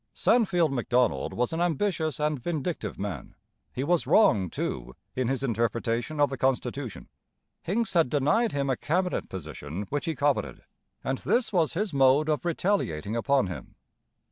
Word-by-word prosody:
Sandfield 180 - +3
Macdonald 125 -1 +1
was 125 +5 -1
an 165 - -1
ambitious 165 -3 0
and 150 -1 0
vindictive 155 - -3
man. 95 -9 -5 0.4
He 130 - -3
was 170 +3 +1
wrong, 105 - +4
too, 60 -5 -4 0.2
in 130 -2 0
his 135 +1 -1
interpretation 115 +3 -1
of 145 -2 +3
the 135 - -5
constitution. 130 -1 -2 0.5
Hincks 220 +6 -1
had 165 -7 +3
denied 150 - +2
him 140 -1 0
a - - +1
cabinet 180 +7 -1
position 80 0 -6
which 145 +2 -1
he 165 -2 -1
coveted, 145 0 0 0.4
and 130 0 -1
this 235 -3 +1
was 165 -4 +2
his 195 0 -2
mode 135 +3 +4
of 155 +2 0
retaliating 155 - 0
upon 130 0 +2
him. 85 -8 -8
140 Hz, 155 wpm, -27 LUFS, 120-170 Hz, 0.5 s, wrong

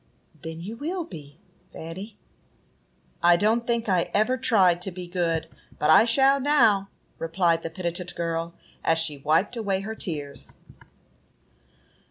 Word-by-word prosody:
"Then 160 0 -7
you 215 +6 -7
will 345 +7 -3
be, 150 - -11 0.3
Fanny." 185 +7 -8 1.0
"I 175 0 +6
don't 225 +5 +1
think 235 -1 0
I 180 -4 +1
ever 215 +5 +3
tried 190 -8 +3
to 190 - -2
be 180 0 -7
good, 175 -2 -1 0.3
but 150 - +2
I 160 - +7
shall 270 +4 +4
now," 230 -9 +3 0.3
replied 165 0 +1
the 165 - -5
penitent 175 +1 -4
girl, 165 0 -3 0.3
as 165 - +2
she 160 -3 -1
wiped 160 - +1
away 200 -4 -1
her 220 +3 -5
tears. 145 - -6
180 Hz, 140 wpm, -25 LUFS, 165-220 Hz, 1.0 s, I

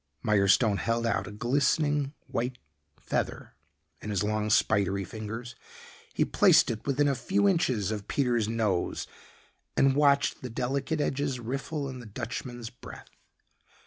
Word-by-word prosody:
Mirestone 100 0 +3
held 115 0 0
out 100 -4 0
a - - -7
glistening 140 +5 +1
white 125 +2 -3 0.4
feather - - -3 0.5
in 105 - -6
his 100 -2 0
long 105 0 -1
spidery 100 -2 +2
fingers. 110 +4 -7 0.6
He - - +3
placed - - +5
it 110 +2 -7
within 145 +1 +2
a 140 - +2
few 200 +9 +1
inches 130 - +1
of 105 -2 -5
Peter's 120 -6 +1
nose 110 -6 -1 0.7
and 135 0 +4
watched 140 -1 +3
the 125 - -5
delicate 135 +6 -1
edges 140 -2 -1
riffle 135 +5 -3
in 130 -1 -7
the 120 - -10
Dutchman's 120 +3 -6
breath. 120 - -12
120 Hz, 140 wpm, -28 LUFS, 105-140 Hz, 0.7 s, placed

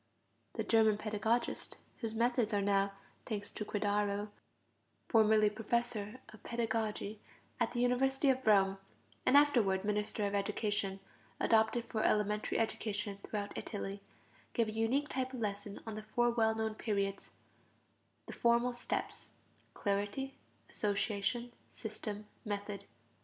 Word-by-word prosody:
The - - -1
German 220 -2 +4
pedagogist, 220 +2 -1 0.2
whose 225 -2 -3
methods 235 -2 +2
are 200 - +2
now, 200 0 +2 0.3
thanks 205 -3 -3
to - - -4
Credaro, 205 0 0 0.8
formerly 220 -2 +5
Professor 225 +1 -1
of 220 - -14
Pedagogy 220 -2 -2 0.4
at 235 0 +1
the 240 - 0
University 265 +3 +3
of 260 -2 -3
Rome, 195 -2 +5 0.5
and 280 - +7
afterward 220 -10 +4
Minister 210 0 0
of 200 - -1
Education, 200 -1 -1 0.4
adopted 225 +1 +3
for 215 - -2
elementary 210 0 +1
education 205 -2 -1
throughout 205 -1 -4
Italy, 200 -2 -4 0.5
gave 230 -3 +2
a - - -3
unique 225 +7 +1
type 260 0 -2
of - - -5
lesson 205 -1 -3
on 220 - -4
the 215 - -5
four 240 +3 +1
well 220 -1 +3
known 220 0 -1
periods 200 -3 -2 1.0
(the - - -7
formal 235 +1 +3
steps): 240 - -3 0.5
clarity, 205 +7 -1 0.3
association, 210 +3 -1 0.2
system, 210 -1 -6 0.2
method. 205 -1 -4
215 Hz, 125 wpm, -34 LUFS, 205-235 Hz, 1.0 s, and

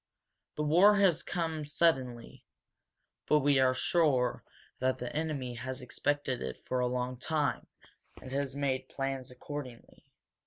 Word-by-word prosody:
This 150 - 0
war 180 +7 +6
has 195 -5 +4
come 160 -3 -2
suddenly 135 -6 0 0.8
but 150 0 +4
we 140 -1 +4
are 130 -1 +4
sure 130 -5 +2 0.4
that 130 0 +1
the 125 +1 -6
enemy 150 -6 -2
has 130 +2 -5
expected 145 +1 -1
it 65 -1 -4
for 130 - -3
a 125 - +2
long 125 0 -2
time, 150 +3 -1 0.5
and 130 - -10
has 140 0 -2
made 135 -2 -1
plans 135 -2 -3
accordingly. 125 -1 -8
135 Hz, 140 wpm, -31 LUFS, 125-150 Hz, 0.8 s, war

